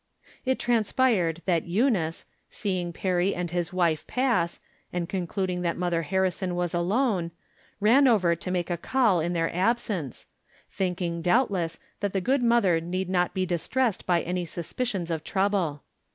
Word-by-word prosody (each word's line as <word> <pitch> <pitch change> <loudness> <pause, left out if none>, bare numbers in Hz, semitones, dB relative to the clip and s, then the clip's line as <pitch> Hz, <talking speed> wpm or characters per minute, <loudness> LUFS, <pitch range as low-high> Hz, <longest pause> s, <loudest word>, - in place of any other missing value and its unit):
It 260 0 +1
transpired 220 -7 +1
that 170 -4 +1
Eunice, 185 -5 +1 0.2
seeing 185 -4 -2
Perry 185 +2 0
and 175 -2 -3
his 175 -1 -1
wife 170 -4 +1
pass, 235 -10 +1 0.3
and 175 -1 -2
concluding 185 -1 -2
that 170 -1 -1
Mother 175 -2 0
Harrison 185 +1 -1
was 175 -1 -1
alone, 185 0 +1 0.5
ran 245 +7 +5
over 185 -8 +4
to 170 - -7
make 180 -1 -1
a 175 - 0
call 220 -1 +2
in 170 +2 -1
their 165 -1 -1
ab 225 +7 +3
sence, 180 - -5 0.5
thinking, 180 -3 -2
doubtless,. 180 -3 +1 0.2
that 205 -2 -2
the 195 - +1
good 260 +8 +1
mother 230 -9 +3
need 180 +2 -3
not 180 0 +1
be 185 -1 +1
distressed 185 +7 -1
by 175 -2 +2
any 180 0 -2
suspicions 175 +2 -3
of 160 -1 -2
trouble. 190 -7 0
180 Hz, 155 wpm, -26 LUFS, 170-205 Hz, 0.5 s, ran